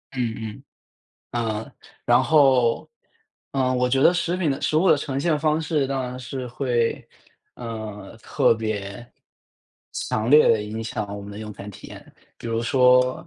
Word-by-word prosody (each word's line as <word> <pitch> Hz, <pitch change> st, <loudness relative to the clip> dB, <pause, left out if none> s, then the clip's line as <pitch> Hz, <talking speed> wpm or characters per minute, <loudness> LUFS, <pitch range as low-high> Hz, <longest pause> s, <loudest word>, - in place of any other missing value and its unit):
嗯 120 Hz, -3 st, -1 dB
嗯。 105 Hz, -1 st, -8 dB, 0.7 s
嗯， 110 Hz, -2 st, -3 dB, 0.3 s
然 120 Hz, +1 st, +5 dB
后， 130 Hz, -5 st, +3 dB, 0.6 s
呃， 130 Hz, -2 st, +1 dB
我 125 Hz, 0 st, +2 dB
觉 135 Hz, +2 st, +2 dB
得 175 Hz, -, +6 dB
食 175 Hz, 0 st, 0 dB
品 170 Hz, -5 st, 0 dB
的 135 Hz, -, -2 dB
食 155 Hz, -, +1 dB
物 185 Hz, -, +3 dB
的 -, -, +6 dB
呈 140 Hz, -1 st, -3 dB
现 155 Hz, -1 st, +1 dB
方 155 Hz, +1 st, +1 dB
式 155 Hz, -4 st, 0 dB
当 135 Hz, -1 st, -2 dB
然 125 Hz, 0 st, -5 dB
是 130 Hz, 0 st, -6 dB
会， 120 Hz, -2 st, -1 dB, 0.5 s
呃， 110 Hz, -3 st, -7 dB
特 -, -, +2 dB
别 110 Hz, 0 st, -5 dB, 0.9 s
强 110 Hz, +3 st, -2 dB
烈 150 Hz, +1 st, +7 dB
地 110 Hz, -2 st, +3 dB
影 110 Hz, +2 st, -5 dB
响 110 Hz, -2 st, -4 dB
我 100 Hz, -, -6 dB
们 100 Hz, +1 st, -9 dB
的 100 Hz, -, -8 dB
用 105 Hz, -1 st, -7 dB
餐 100 Hz, +1 st, -9 dB
体 100 Hz, -, -12 dB
验。 -, -, -13 dB, 0.2 s
比 -, -, -8 dB
如 115 Hz, 0 st, -1 dB
说 125 Hz, +5 st, +3 dB
125 Hz, 185 characters per minute, -23 LUFS, 110-135 Hz, 0.9 s, 烈